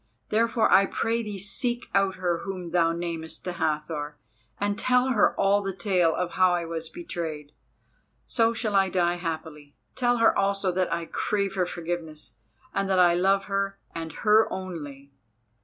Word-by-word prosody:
Therefore 230 Hz, +1 st, +2 dB
I 195 Hz, +1 st, +6 dB
pray 230 Hz, +1 st, -1 dB
thee 210 Hz, -3 st, -5 dB
seek 240 Hz, +5 st, -2 dB
out 195 Hz, -1 st, +2 dB
her 175 Hz, -2 st, -1 dB
whom 180 Hz, -2 st, -6 dB
thou 165 Hz, -1 st, +3 dB
namest 165 Hz, -1 st, -5 dB
the 180 Hz, -, -3 dB
Hathor 150 Hz, -2 st, -2 dB, 0.4 s
and 205 Hz, 0 st, -1 dB
tell 250 Hz, +1 st, +3 dB
her 230 Hz, -5 st, +2 dB
all 200 Hz, +1 st, +3 dB
the 195 Hz, -2 st, -4 dB
tale 180 Hz, -3 st, +2 dB
of 180 Hz, -1 st, -2 dB
how 185 Hz, -1 st, +3 dB
I 170 Hz, -1 st, -2 dB
was 165 Hz, -1 st, -5 dB
betrayed. 160 Hz, -, -6 dB, 0.7 s
So 230 Hz, -1 st, +2 dB
shall 225 Hz, -2 st, -2 dB
I 195 Hz, -1 st, +4 dB
die 175 Hz, -1 st, +1 dB
happily. 160 Hz, -4 st, -6 dB, 0.2 s
Tell 245 Hz, -1 st, +2 dB
her 230 Hz, -1 st, +4 dB
also 195 Hz, -1 st, +1 dB
that 185 Hz, +1 st, -1 dB
I 170 Hz, 0 st, -1 dB
crave 200 Hz, +3 st, -1 dB
her 180 Hz, -2 st, 0 dB
forgiveness 165 Hz, -3 st, -5 dB, 0.4 s
and 195 Hz, 0 st, -1 dB
that 190 Hz, -, +2 dB
I 175 Hz, -1 st, +6 dB
love 195 Hz, +3 st, +2 dB
her 195 Hz, 0 st, -2 dB, 0.2 s
and 165 Hz, -1 st, -5 dB
her 215 Hz, +1 st, +5 dB
only." 145 Hz, -7 st, -7 dB
185 Hz, 170 wpm, -26 LUFS, 165-200 Hz, 0.7 s, I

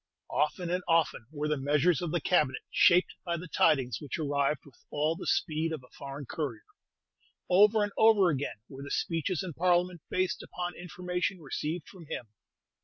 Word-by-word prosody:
Often 170 Hz, +3 st, 0 dB
and 180 Hz, +1 st, 0 dB
often 165 Hz, -9 st, +2 dB
were 150 Hz, -1 st, -2 dB
the 150 Hz, -2 st, 0 dB
measures 150 Hz, +3 st, +3 dB
of 175 Hz, -, -2 dB
the 175 Hz, -, +1 dB
Cabinet 150 Hz, -6 st, +1 dB
shaped 180 Hz, +1 st, +5 dB
by 170 Hz, -2 st, -1 dB
the 180 Hz, +2 st, -7 dB
tidings 130 Hz, -8 st, +2 dB
which 145 Hz, -, -4 dB
arrived 145 Hz, -2 st, 0 dB
with 140 Hz, -, -16 dB, 0.2 s
all 150 Hz, +2 st, 0 dB
the 180 Hz, -, -7 dB
speed 160 Hz, -1 st, 0 dB
of 155 Hz, -5 st, -5 dB
a 125 Hz, -, -20 dB
foreign 140 Hz, +1 st, -7 dB
courier; 130 Hz, -5 st, -4 dB, 0.9 s
over 210 Hz, +3 st, +6 dB
and 205 Hz, -, -2 dB
over 210 Hz, -5 st, +6 dB
again 140 Hz, -6 st, -3 dB
were 135 Hz, 0 st, -10 dB
the 140 Hz, -, -7 dB
speeches 165 Hz, +2 st, -1 dB
in 180 Hz, -3 st, -5 dB
Parliament 175 Hz, 0 st, +1 dB
based 185 Hz, -1 st, 0 dB
upon 175 Hz, 0 st, -5 dB
information 180 Hz, +1 st, -3 dB
received 155 Hz, +2 st, -4 dB
from 175 Hz, -5 st, -13 dB
him. 120 Hz, -5 st, -5 dB
165 Hz, 180 wpm, -30 LUFS, 145-180 Hz, 0.9 s, over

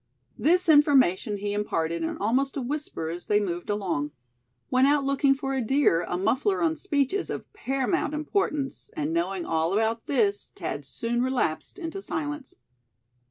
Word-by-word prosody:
This 355 Hz, +3 st, +4 dB
information 275 Hz, -, +4 dB
he 205 Hz, +1 st, -3 dB
imparted 170 Hz, -5 st, -1 dB
in 160 Hz, -, -2 dB
almost 260 Hz, +7 st, 0 dB
a -, -, -1 dB
whisper 280 Hz, -, -3 dB
as 175 Hz, +2 st, -6 dB
they 210 Hz, -, +3 dB
moved 175 Hz, -3 st, -3 dB
along. 185 Hz, -8 st, -1 dB, 0.6 s
When 255 Hz, +1 st, +4 dB
out 290 Hz, 0 st, +3 dB
looking 275 Hz, 0 st, +3 dB
for 270 Hz, -1 st, -2 dB
deer, 235 Hz, -8 st, +3 dB
a 175 Hz, -, -1 dB
muffler 255 Hz, -, +1 dB
on 320 Hz, -1 st, +2 dB
speech 290 Hz, -5 st, 0 dB
is 400 Hz, -, -1 dB
of -, -, -6 dB
paramount 275 Hz, -3 st, -1 dB
importance; 300 Hz, -3 st, -2 dB
and 150 Hz, +2 st, -2 dB
knowing 175 Hz, +2 st, -1 dB
all 165 Hz, +2 st, 0 dB
about 225 Hz, +2 st, 0 dB
this, 210 Hz, -7 st, +1 dB
Thad 145 Hz, -, -4 dB
soon 230 Hz, -, -2 dB
relapsed 250 Hz, -, -1 dB
into 360 Hz, +1 st, -5 dB
silence. 295 Hz, -5 st, -4 dB
255 Hz, 160 wpm, -26 LUFS, 190-290 Hz, 0.6 s, This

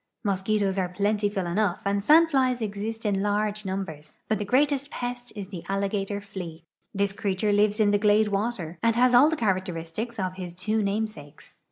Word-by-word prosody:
Mosquitos 200 Hz, -1 st, 0 dB
are 180 Hz, -1 st, 0 dB
plentiful 205 Hz, 0 st, 0 dB
enough 185 Hz, +2 st, 0 dB
and 200 Hz, 0 st, 0 dB
sandflies 275 Hz, -4 st, +4 dB
exist 220 Hz, +1 st, -4 dB
in 200 Hz, -2 st, +1 dB
large 210 Hz, +1 st, -1 dB
numbers, 170 Hz, -6 st, -5 dB
but 215 Hz, -1 st, 0 dB
the 205 Hz, -, -2 dB
greatest 280 Hz, +4 st, +2 dB
pest 245 Hz, -1 st, -5 dB
is 205 Hz, -2 st, -5 dB
tlie 180 Hz, -4 st, -7 dB
alligator 200 Hz, +1 st, -1 dB
flea. 180 Hz, -5 st, -8 dB, 0.3 s
This 200 Hz, 0 st, 0 dB
creature 200 Hz, +1 st, 0 dB
lives 205 Hz, +1 st, +2 dB
in 210 Hz, -1 st, +4 dB
the 205 Hz, -, +3 dB
glade 210 Hz, 0 st, +4 dB
water, 195 Hz, -5 st, -2 dB
and 230 Hz, -1 st, +2 dB
has 250 Hz, +1 st, +4 dB
all 260 Hz, +5 st, +7 dB
the 320 Hz, -, 0 dB
(iharacteristics 190 Hz, -, -2 dB
of 185 Hz, -1 st, -2 dB
his 180 Hz, -2 st, -7 dB
two 215 Hz, +5 st, 0 dB
namesakes. 205 Hz, -7 st, -4 dB
205 Hz, 175 wpm, -26 LUFS, 190-220 Hz, 0.3 s, all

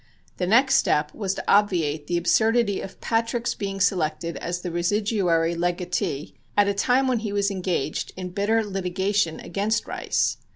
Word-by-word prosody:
] -, -, -35 dB
The 180 Hz, -, 0 dB
next 260 Hz, +7 st, +5 dB
step 150 Hz, 0 st, +1 dB
was 195 Hz, -3 st, -2 dB
to -, -, -5 dB
obviate 165 Hz, -8 st, +2 dB
the 175 Hz, -, 0 dB
absurdity 220 Hz, +4 st, +2 dB
of 185 Hz, -, -9 dB
Patrick's 230 Hz, +1 st, 0 dB
being 195 Hz, -1 st, -4 dB
selected 170 Hz, -3 st, 0 dB
as 175 Hz, +1 st, -4 dB
the 175 Hz, -, -4 dB
residuary 175 Hz, -2 st, +1 dB
legatee 175 Hz, -4 st, -2 dB, 0.2 s
at 205 Hz, -1 st, +5 dB
a 200 Hz, -, +2 dB
time 250 Hz, +6 st, +2 dB
when 250 Hz, -3 st, +1 dB
he 215 Hz, -2 st, -4 dB
was 200 Hz, 0 st, +1 dB
engaged 180 Hz, -6 st, -2 dB
in 185 Hz, -1 st, -5 dB
bitter 215 Hz, +3 st, +1 dB
litigation 190 Hz, -2 st, -1 dB
against 205 Hz, +5 st, -1 dB
Rice. -, -, -1 dB
195 Hz, 165 wpm, -24 LUFS, 175-210 Hz, 0.2 s, next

